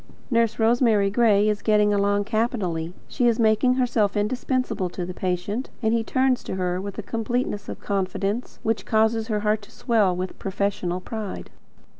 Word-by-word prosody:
Nurse 230 -2 +2
Rosemary 225 -3 +3
Gray 210 -2 +4
is 210 -1 0
getting 210 -1 +3
on 205 0 +2
capitally. 205 -7 -1 0.2
She 245 -3 +1
is 235 -1 +2
making 225 +3 +3
herself 230 -5 +1
indispensable 245 -2 -1
to 180 0 -5
the 180 - -6
patient, 185 +7 -2
and 220 0 +2
he 230 -1 +1
turns 260 +2 +1
to - - -4
her 180 -1 -1
with 200 0 -6
a 220 - -4
completeness 225 -1 -2
of - - -6
confidence 200 +3 -2
which 225 +1 -1
causes 220 0 +2
her 210 -2 -1
heart 210 0 +1
to 205 - -15
swell 210 -6 +1
with 185 +1 -5
professional 190 -2 -2
pride. 215 0 -6
210 Hz, 170 wpm, -24 LUFS, 195-230 Hz, 0.2 s, Gray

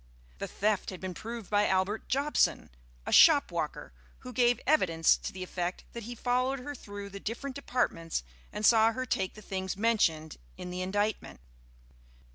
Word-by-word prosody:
The - - -3
theft 210 -1 0
had 185 - -7
been 185 -1 -5
proved 225 +2 -7
by 205 0 +3
Albert 190 +3 0
Jobson, 280 - +1 0.3
a - - -4
shopwalker, - - +4 0.3
who 250 - -9
gave 245 -1 +3
evidence 165 - +4
to - - -6
the 185 -1 -6
effect 180 0 -4
that 235 -2 -7
he 240 +1 -6
followed 255 +3 0
her 290 +3 -6
through 205 -5 -8
the 200 - -7
different 250 +6 -5
departments 165 - -1 0.3
and 210 - -2
saw 225 0 +6
her 255 +2 -3
take 190 -6 -1
the 215 - -12
things 190 -1 -4
mentioned 180 -8 +1 0.2
in 180 - -7
the 180 0 -4
indictment. 205 +3 -2
210 Hz, 165 wpm, -30 LUFS, 185-245 Hz, 0.3 s, saw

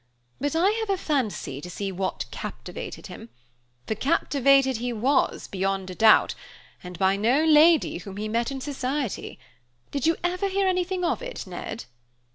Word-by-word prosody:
But 290 +2 -1
I 360 +5 +4
have 445 -2 -3
a 390 - +2
fancy 220 - -2
to 180 - -8
see 195 +2 -4
what 185 0 -3
captivated - - -7
him; 115 - -10 0.6
for - - -1
captivated 275 0 +3
he 245 +2 -3
was, 255 +5 +1
beyond 195 -1 -2
a - - -6
doubt, 220 +3 +5 0.5
and 180 -1 -8
by 190 +1 +3
no 245 +10 +2
lady 315 - +5
whom 195 +1 -9
he 215 +1 -3
met 230 +3 0
in 270 -1 -5
society. 270 -3 -3 0.5
Did 280 +1 -1
you 330 - +3
ever 360 +2 0
hear 390 0 +1
anything 365 0 0
of - - 0
it, - - -6
Ned?" 225 - -6
265 Hz, 165 wpm, -25 LUFS, 200-325 Hz, 0.6 s, doubt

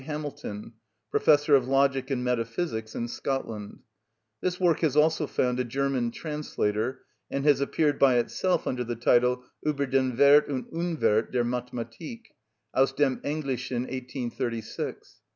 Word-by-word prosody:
Hamilton, 145 -8 -6 0.4
Professor 150 -1 +4
of 130 -2 +2
Logic 135 0 +2
and 130 -3 -1
Metaphysics 115 -1 -2
in 120 - -2
Scotland. 115 -5 -4 0.6
This 180 0 -1
work 175 -4 +3
has 150 -3 +1
also 155 0 +3
found 125 -1 0
a - - +2
German 130 -1 -1
translator, 125 -5 -2 0.3
and 140 +1 -2
has 145 -2 +4
appeared 145 +1 +1
by 135 -2 +5
itself 180 +9 0
under 125 -1 -1
the 120 0 -4
title, 125 +2 +3 0.2
"Ueber 145 -2 0
den 130 -2 +1
Werth 145 +2 +6
und 130 -3 -2
Unwerth 160 -10 +1
der 125 -1 +1
Mathematik" 125 - -5 0.4
aus 135 0 +3
dem 135 -2 +1
Englishen, 130 -4 -2
1836. 125 -3 -5
130 Hz, 135 wpm, -27 LUFS, 120-145 Hz, 0.6 s, Werth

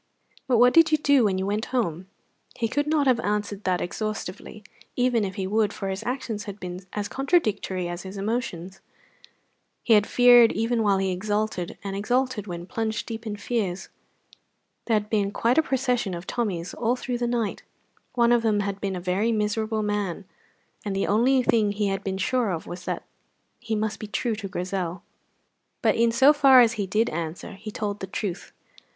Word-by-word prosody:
But 250 -2 +3
what 245 +2 +6
did 330 -1 +6
you 310 - +5
do 285 -5 +4
when 190 -2 +1
you 190 - -1
went 210 +3 -1
home?" 190 -8 -2 0.5
He 230 - -1
could 290 +6 -1
not 300 -2 +2
have 255 -3 +3
answered 205 -1 -2
that 180 -1 +1
exhaustively, 215 +1 -5 0.3
even 245 -3 +2
if 190 -1 -4
he 190 - -3
would, 210 +2 +1
for 195 - -4
his 190 0 -3
actions 240 -4 -3
had 200 0 -7
been 180 -1 -6
as 205 -1 -2
contradictory 215 - 0
as 175 0 -5
his 190 +2 -8
emotions. 195 -4 -3 1.0
He 230 - +4
had 210 -1 +5
feared 245 -2 +6
even 230 +1 0
while 200 -2 +3
he 190 0 0
exulted, 205 -1 -2
and 195 -1 -4
exulted 245 +1 -1
when 175 -1 -6
plunged 220 +3 -3
deep 225 0 -6
in 210 - -3
fears. 200 -4 -3 1.0
There 230 - +2
had 210 0 0
been 210 -2 +1
quite 235 +7 +2
a - - +6
procession 250 - -1
of 170 +1 -7
Tommies 185 -8 -3
all 240 +1 0
through 250 -1 -4
the 240 - 0
night; 235 -4 -1 0.5
one 235 -1 +4
of 240 -1 +4
them 215 -2 +1
had 200 0 -4
been 195 -2 -2
a - - -3
very 190 +6 0
miserable 215 0 -1
man, 205 -3 -2 0.6
and 200 -2 -3
the 195 - 0
only 250 +5 +3
thing 215 -4 +2
he 205 -1 0
had 195 0 -3
been 190 -1 -2
sure 235 +3 0
of 170 -3 -3
was 180 +1 -8
that - - -3 0.6
he 230 -3 -3
must 215 0 -2
be 215 - -6
true 225 +3 -1
to 205 -2 -5
Grizel. 180 -2 -4 0.8
But - - +4
in 230 0 +3
so 265 +5 +6
far 275 -3 +7
as 235 -2 +5
he 205 -4 -3
did 215 +5 +1
answer 165 +1 -5
he 205 +2 -8
told 210 -1 -4
the 190 - -5
truth. 190 -1 -5
210 Hz, 195 wpm, -25 LUFS, 195-235 Hz, 1.0 s, far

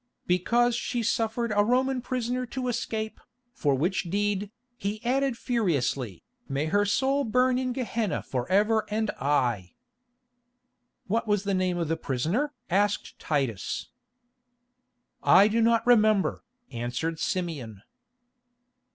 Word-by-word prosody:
"Because 235 +7 +2
she 235 0 -2
suffered 225 0 0
a 205 - +5
Roman 255 +3 +1
prisoner 250 0 -2
to 255 +1 -4
escape, 220 -2 -3 0.3
for 140 -3 +1
which 175 +9 0
deed," 205 +1 0 0.3
he 205 -1 -3
added 265 0 +1
furiously, 140 - -1 0.3
"may 140 +2 -1
her 205 +6 +2
soul 270 +7 +1
burn 250 +2 +2
in 255 -1 -1
Gehenna 230 - -2
for 125 +1 -3
ever 215 +3 +3
and 220 0 0
aye!" 120 - 0 1.3
"What 225 +3 -1
was 205 -2 +1
the 200 -1 -1
name 185 -1 +1
of 170 -2 -1
the 165 +1 0
prisoner?" 165 - -1 0.2
asked 205 +3 0
Titus. 135 -9 -2 1.3
"I 200 - +6
do 225 +2 +1
not 230 0 +3
remember," 215 -4 +3 0.3
answered 125 +7 -3
Simeon. 140 - -3
205 Hz, 125 wpm, -27 LUFS, 160-235 Hz, 1.3 s, I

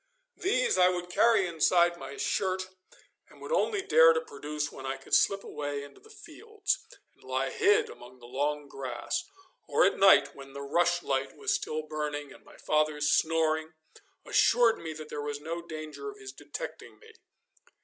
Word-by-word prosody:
These 475 - +1
I 180 0 +6
would 180 0 -4
carry 220 0 +4
inside 175 +1 +3
my 140 -4 -9
shirt, 185 -1 -1 0.6
and - - -18
would - - -8
only 430 -5 +1
dare 165 - +6
to 160 - 0
produce 150 -1 -5
when 135 - -10
I 135 0 -3
could 135 - -13
slip 195 0 +3
away 145 -1 -4
into 145 - -13
the 440 - -19
fields, 435 -2 -4 0.3
and - - -26
lie - - -2
hid 425 +2 +3
among 125 +1 -13
the 120 - -15
long 145 +4 -2
grass, 135 - -4 0.4
or - - +4
at - - +1
night 190 -8 +6
when 135 -1 -12
the 140 0 -6
rushlight 165 -3 0
was - - 0
still 155 0 -2
burning, 150 -2 -4
and - - -17
my - - -17
father's 150 -1 +1
snoring 160 0 +1 0.5
assured 235 -1 +4
me 160 -1 -6
that 155 0 -9
there 145 - -4
was 145 0 -4
no 165 +3 -5
danger 155 - -7
of 410 - -11
his 410 -1 -9
detecting - - -8
me. 450 0 -17
160 Hz, 175 wpm, -29 LUFS, 145-195 Hz, 0.6 s, I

